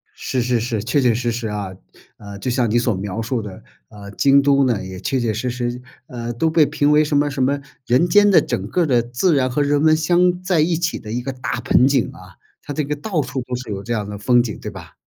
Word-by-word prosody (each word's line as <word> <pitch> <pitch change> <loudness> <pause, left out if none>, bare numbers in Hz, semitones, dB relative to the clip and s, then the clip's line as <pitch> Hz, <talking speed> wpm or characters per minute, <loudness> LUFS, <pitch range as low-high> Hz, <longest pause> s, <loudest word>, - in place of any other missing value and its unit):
是 130 - -2
是 120 0 +1
是， 115 -2 -3
确 130 +5 +1
确 125 -3 +3
实 120 +1 -1
实 115 0 -4
啊。 105 -3 -4 0.5
呃， 100 -1 -10
就 125 - -2
像 120 -2 +1
你 115 - +2
所 120 -1 +1
描 100 +3 -4
述 115 +2 -2
的， 105 -3 -10 0.3
呃， 100 -1 -11
京 140 +6 +4
都 140 0 +3
呢， 120 -6 0
也 95 0 -8
确 130 +6 -1
确 115 -3 -1
实 115 +4 -3
实， 120 0 -3 0.3
呃， 120 -1 -5
都 140 +8 0
被 160 -1 +4
评 145 0 +1
为 150 +1 +5
什 150 -1 0
么 145 0 +2
什 135 -1 -3
么 140 +2 +1 0.3
人 130 +8 +3
间 205 +3 +5
的 195 - +6
整 - - -3
个 180 - +1
儿 - - +1
的 125 -5 +2
自 125 +9 0
然 130 -2 +1
和 145 +4 0
人 145 0 +1
文 155 0 +5
相 175 +2 +2
在 185 -3 +1
一 165 +2 +1
起 170 +1 -2
的 105 - -9
一 120 +2 -2
个 135 +2 -5
大 125 -2 -4
盆 125 +2 +4
景 135 -4 +1
啊， - - -15 0.2
它 145 - -7
这 150 - -1
个 145 +1 -3
到 160 +2 -2
处 130 -1 -4
都 125 0 -5
是 125 -3 -7
有 100 -1 -4
这 120 - -7
样 105 -3 -2
的 105 0 -6
风 120 +4 +3
景， 110 -3 -6
对 - - -6
吧？ - - -11
125 Hz, 285 characters per minute, -20 LUFS, 115-145 Hz, 0.5 s, 的